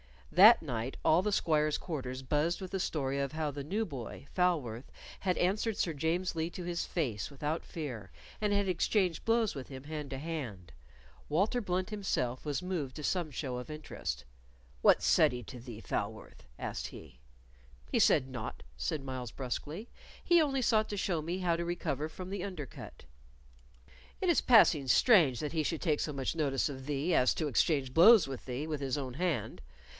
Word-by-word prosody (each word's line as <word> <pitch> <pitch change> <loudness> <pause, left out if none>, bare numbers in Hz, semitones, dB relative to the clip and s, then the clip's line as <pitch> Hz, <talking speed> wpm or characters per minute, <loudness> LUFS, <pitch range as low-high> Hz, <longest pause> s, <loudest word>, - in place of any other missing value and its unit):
That 210 +4 +8
night 125 -3 -3
all 160 +3 +5
the 210 +1 -1
squires' 155 -4 +2
quarters 130 -6 -5
buzzed 150 +5 0
with 185 - -6
the 195 - -1
story 140 -5 -1
of 140 +1 -2
how 155 -2 -1
the 140 0 -6
new 210 +8 -1
boy, 135 - -7
Falworth, 145 -10 0 0.3
had 185 -2 0
answered 205 +4 +1
Sir 165 - 0
James 165 +5 -1
Lee 160 +1 -1
to 180 - -7
his 175 0 -2
face 120 - -2
without 150 +3 -3
fear, 125 - -6 0.3
and 210 -1 0
had 200 -1 +2
exchanged 180 -1 +1
blows 225 -2 +2
with 135 -3 -7
him 130 -1 -9
hand 150 -1 -5
to 135 - -4
hand. 130 - -5 0.6
Walter 195 +10 +2
Blunt 185 -1 -1
himself 155 - -2
was 150 +4 -2
moved 165 -8 -3
to 150 - -7
some 175 0 0
show 130 -2 -4
of 125 - -7
interest. 145 - -5 0.6
"What - - +5
said - - +5
he 125 0 -5
to 120 +4 -9
thee, 115 -2 -9
Falworth?" 110 0 -5
asked - - -4
he. 65 -5 -12 0.7
"He - - +2
said 130 - +4
naught," 120 -4 -6
said 135 - -2
Myles, 130 -4 -5
brusquely. 150 - -5 0.3
"He 345 -1 +5
only 270 -3 +1
sought 220 -2 +3
to 205 - -3
show 175 -4 0
me 170 +4 -3
how 175 -2 +1
to 170 - -2
recover 160 -3 -2
from 185 +3 -8
the 195 -2 -3
under 185 -7 -5
cut." - - -11 1.2
"It 370 - +1
is 340 - +4
passing 175 - +5
strange 155 - +5
that 150 - -3
he 160 - +1
should 155 +1 -2
take 155 -5 +1
so 150 - -2
much 135 +2 -2
notice 145 -3 +1
of 135 -2 -7
thee 150 +4 0
as 130 -4 +4
to 155 - -1
exchange 140 -1 +1
blows 185 - +8
with 135 -2 -7
thee 130 +3 -3
with 155 -2 -3
his 135 0 -1
own 130 -3 -4
hand. 175 0 -2
155 Hz, 190 wpm, -32 LUFS, 130-180 Hz, 1.2 s, That